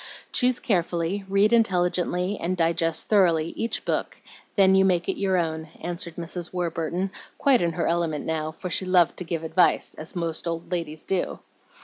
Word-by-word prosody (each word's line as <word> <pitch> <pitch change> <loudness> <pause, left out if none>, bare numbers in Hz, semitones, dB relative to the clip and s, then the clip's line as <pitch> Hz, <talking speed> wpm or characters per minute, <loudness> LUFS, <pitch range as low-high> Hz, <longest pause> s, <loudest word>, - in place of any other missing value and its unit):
Choose 250 -1 +2
carefully, 180 -3 -1
read 200 +3 +3
intelligently, 180 -3 +1
and 185 +2 -1
digest 165 -1 +1
thoroughly 170 -6 +3
each 230 0 -3
book, - - -1
and - - -21 0.2
then 190 -2 +5
you 190 0 +5
make 180 -2 +2
it - - -2
your 190 -2 +2
own," 160 -2 -2
answered 170 -1 -4
Mrs. 170 0 -5
Warburton, 175 +1 -2 0.3
quite 270 -3 +4
in 170 -1 0
her - - -1
element 165 -3 0
now, 155 -1 -2
for 180 +3 -7
she 190 - +1
loved 180 -2 +4
to - - -3
give 165 -1 -3
advice, 175 +2 +2
as 160 +4 -7
most 170 -1 -2
old 165 +1 -4
ladies 160 -3 -3
do. 190 -2 -1
175 Hz, 175 wpm, -25 LUFS, 165-190 Hz, 0.3 s, then